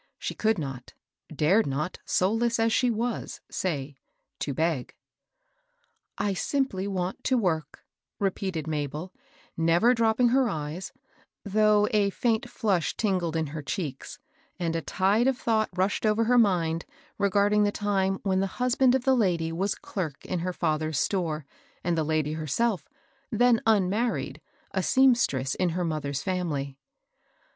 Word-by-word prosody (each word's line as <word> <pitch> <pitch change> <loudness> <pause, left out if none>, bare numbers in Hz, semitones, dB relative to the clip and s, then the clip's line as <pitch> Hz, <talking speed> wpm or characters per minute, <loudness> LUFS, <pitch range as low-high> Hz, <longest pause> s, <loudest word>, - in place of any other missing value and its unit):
She - - -4
could 220 -1 +1
not 135 -5 -6 0.2
— - - -63 0.2
dared 195 +6 +4
not, 145 +6 -3
soulless 225 +5 +1
as 225 0 +2
she 250 - +3
was, 235 +1 -2
say 145 -6 -3 0.2
" - - -53
to 145 - -2
beg.*^ 155 -2 -1 0.8
" 480 -1 -46
I 200 - +1
simply 200 -3 -1
want 185 +4 -3
work," 170 - 0 0.3
repeated 190 -5 -2
Mabel, 155 +3 -4 0.4
never 170 +9 +4
dropping 230 +1 +3
her 260 0 +3
eyes, 155 +1 -4 0.5
though 210 +1 +3
a 205 -3 +3
faint 230 +3 0
flush 200 -9 0
tingled 180 -6 0
in 160 -1 0
her 150 +1 -6
cheeks, 140 -2 -5 0.4
and 170 -3 -1
a 165 - 0
tide 205 +9 +2
of 265 -2 +2
thought 220 -3 +1
rushed 190 +2 0
over 215 +1 +3
her 245 +2 +4
mind 170 -6 +2 0.4
regarding 205 +1 +3
the 205 0 +3
time 195 -2 0
when 190 -2 +1
the 195 - +1
husband 250 +1 +3
of 260 - 0
the 265 0 +4
lady 175 -8 +1
was 190 +5 -1
clerk 160 -8 -5
in 185 - -2
her 180 +2 -2
father's 155 -3 -1
store, 160 -4 -1 0.4
and 175 0 +1
the 160 - +1
lady 155 -1 0
herself, 170 - -1 0.4
then 240 0 +4
unmarried, 215 +2 +1 0.3
a - - 0
seamstress 235 - +3
in 180 -1 0
her 175 +1 -1
moth 155 -3 -2
er's 140 0 -3
fiimily. 160 -8 -2
190 Hz, 150 wpm, -27 LUFS, 160-220 Hz, 0.8 s, dared